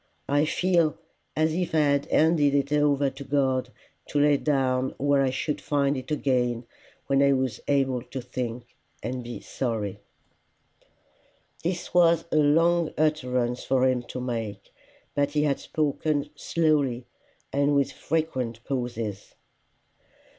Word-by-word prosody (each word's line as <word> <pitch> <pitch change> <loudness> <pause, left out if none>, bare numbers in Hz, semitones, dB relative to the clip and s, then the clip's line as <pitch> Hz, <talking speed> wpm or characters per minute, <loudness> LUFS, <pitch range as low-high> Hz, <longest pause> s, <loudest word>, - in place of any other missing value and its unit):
I 145 +2 +3
feel 170 -1 +2 0.4
as 155 0 +2
if 175 -1 -1
I - - +4
had 140 -1 +2
handed 155 -3 +3
it 140 +1 +1
over 145 -2 +2
to 135 +1 -9
God 130 -2 0 0.4
to 145 - 0
lay 145 0 +5
down 130 -3 0
where 140 0 +2
I 135 - +2
should 140 +3 -2
find 140 -1 +1
it 130 -1 -6
again 125 -5 0 0.4
when 140 0 +2
I 140 0 +5
was 130 -2 -1
able 135 -3 +1
to 130 +2 -7
think 125 -1 -5 0.4
and 125 +2 -3
be 120 0 -7
sorry." 110 -6 -3 1.6
This 175 +1 -3
was 170 -2 +4
a - - +2
long 165 +3 +4
utterance 125 -5 0
for 130 -1 +2
him 130 -1 +1
to 130 - -5
make, 115 -5 -5 0.4
but 145 0 0
he 150 -1 +2
had 140 -2 +1
spoken 150 -1 -1
slowly, 145 -7 +1 0.5
and 145 +1 +2
with 140 -1 +2
frequent 130 -8 -2
pauses. 115 -6 -4
140 Hz, 140 wpm, -26 LUFS, 125-150 Hz, 1.6 s, lay